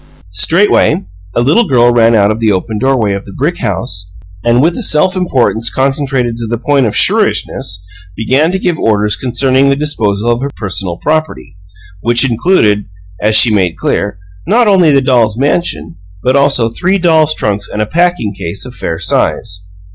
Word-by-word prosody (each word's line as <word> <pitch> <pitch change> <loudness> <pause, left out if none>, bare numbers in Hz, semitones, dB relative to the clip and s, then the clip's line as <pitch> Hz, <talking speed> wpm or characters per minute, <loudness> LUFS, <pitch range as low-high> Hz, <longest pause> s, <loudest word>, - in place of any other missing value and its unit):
Straightway, 165 - +2 0.3
a - - +2
little 160 - +2
girl 120 -4 +3
ran 115 -1 +3
out 100 -1 +3
of 110 - -3
the 110 -2 +1
open 105 +3 -2
doorway 120 -5 +1
of 100 0 -4
the 100 - -11
brick - - -1
house 90 +1 -2 0.3
and, 120 +1 +2
with 165 +5 +2
a - - -5
self 185 -1 +1
importance 125 -10 0
concentrated 135 -3 -1
to 115 -1 -5
the 120 +1 -2
point 135 0 +1
of 105 - -4
shrewishness, 90 +1 0 0.3
began 135 +9 +1
to 190 - -1
give 180 -3 -2
orders 105 -1 +1
concerning 130 +2 +1
the 140 - +2
disposal 115 -7 -1
of 120 +1 -1
her 140 - -2
personal 95 -3 -4
property, 155 - -3 0.4
which 120 +6 +2
included 115 - +1 0.4
(as 110 +1 +1
she 110 0 +5
made 90 -5 0
clear) 100 -2 -2 0.3
not 230 +4 +3
only 185 -6 +4
the 140 -1 +3
dolls' 120 -5 +1
mansion, 120 - -1 0.3
but 130 +2 +1
also 140 -5 +3
three 185 - 0
dolls' 160 -4 +3
trunks 100 -1 -2
and 105 - -5
a 105 - +1
packing 170 -6 0
case 95 +2 -4
of 125 - -9
fair 80 -8 -4
size. 90 +2 -1
120 Hz, 180 wpm, -12 LUFS, 105-145 Hz, 0.4 s, she